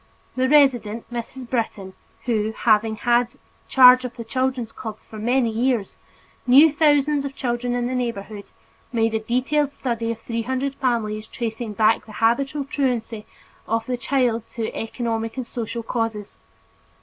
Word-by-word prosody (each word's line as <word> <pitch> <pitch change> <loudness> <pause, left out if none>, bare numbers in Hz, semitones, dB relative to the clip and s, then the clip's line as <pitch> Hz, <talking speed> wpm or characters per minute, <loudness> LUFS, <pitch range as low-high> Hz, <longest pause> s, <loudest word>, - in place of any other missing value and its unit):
The 260 0 +1
resident, 245 -7 +3
Mrs. 240 +2 -6
Britton, 220 -6 -3 0.3
who, 220 -2 0
having 220 -1 +3
had 240 +2 +1 0.3
charge 255 -1 +7
of 250 -1 -6
our 230 - -6
children's 255 -1 -1
clubs 220 -1 -8
for 215 - -10
many 240 +1 +1
years, 235 -2 0 0.5
knew 285 +5 +7
thousands 290 -1 +3
of 275 -1 -5
children 245 0 -2
in 245 0 -1
the 250 - -2
neighborhood, 220 -4 -4 0.5
made 225 -2 +1
a 220 - +1
detailed 265 +6 0
study 235 -4 -3
of 230 - -4
three 230 0 -3
hundred 260 +3 -2
families 220 -5 -1
tracing 225 -1 -4
back 220 +2 +2
the 215 - -11
habitual 270 +6 +1
truancy 240 -6 -2 0.4
of 225 0 0
the 250 - -1
child 245 -3 0
to 225 -2 -4
economic 225 0 -3
and 255 - -3
social 235 0 -5
causes. 225 -3 -3
235 Hz, 150 wpm, -22 LUFS, 225-255 Hz, 0.5 s, charge